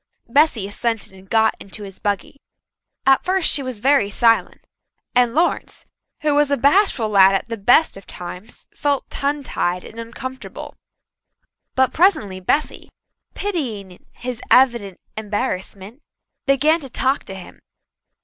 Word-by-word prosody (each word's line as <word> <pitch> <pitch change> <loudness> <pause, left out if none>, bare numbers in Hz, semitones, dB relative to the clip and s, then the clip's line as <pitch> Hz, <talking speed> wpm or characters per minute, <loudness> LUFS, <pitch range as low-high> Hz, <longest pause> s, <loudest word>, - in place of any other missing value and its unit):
Bessy 265 -5 +3
assented 225 -1 -3
and 190 0 -16
got 220 -1 +3
into 200 +2 -8
his 195 -2 -10
buggy. 205 +7 -3 0.6
At 270 0 +4
first 375 -2 +1
she 285 - +1
was 255 -3 -5
very 265 -2 +3
silent, 230 +2 +1 0.5
and 245 -1 +3
Lawrence, 340 +3 0 0.4
who 300 -1 +2
was 290 0 +3
a 280 - +1
bashful 280 - +3
lad 195 -2 +5
at 195 - -2
the 230 - -2
best 235 +6 +3
of 195 - -14
times, 180 +5 -9
felt 285 -2 -1
tongue 285 +1 -2
tied 180 -7 -2
and 225 - -11
uncomfortable. 260 +3 -8 1.0
But 260 -1 +2
presently 310 - +2
Bessy, 285 +11 -1 0.5
pitying 230 - -4
his 245 -2 -6
evident 235 -7 +3 0.2
embarrassment, 210 +1 -4 0.5
began 295 +4 +3
to 275 -4 -9
talk 265 +3 0
to 195 - -7
him. 185 - -12
235 Hz, 140 wpm, -20 LUFS, 200-280 Hz, 1.0 s, lad